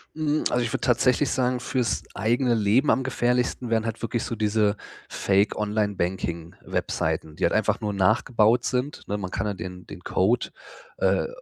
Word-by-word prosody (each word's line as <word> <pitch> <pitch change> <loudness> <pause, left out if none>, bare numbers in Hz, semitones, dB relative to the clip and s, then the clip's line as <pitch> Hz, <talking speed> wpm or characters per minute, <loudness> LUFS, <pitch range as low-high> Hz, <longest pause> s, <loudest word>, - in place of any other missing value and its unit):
Hm, 155 -1 0
also 125 - +1
ich 115 - -2
würde - - -1
tatsächlich 125 +3 +2
sagen, 125 -1 0
für's 125 -1 -1
eigene 120 +4 +1
Leben 110 +7 +3
am 130 - +3
gefährlichsten 125 -1 0
wären 115 -1 +1
halt 115 -1 -4
wirklich 115 0 -2
so 115 - -3
diese 105 -1 +1 0.3
Fake 100 +1 +1
Online-Banking-Webseiten, 90 -6 -2
die 90 - -5
halt - - +3
einfach 110 +1 +1
nur 105 -1 -2
nachgebaut 110 +4 +3
sind, 130 +3 -2
ne? 105 - -2
Man 95 -2 -4
kann - - -2
ja 105 - -1
den 90 -1 -8
den 90 - -10
Code, 100 +7 +1 0.5
äh, - - +2
110 Hz, 170 wpm, -25 LUFS, 100-125 Hz, 0.5 s, Leben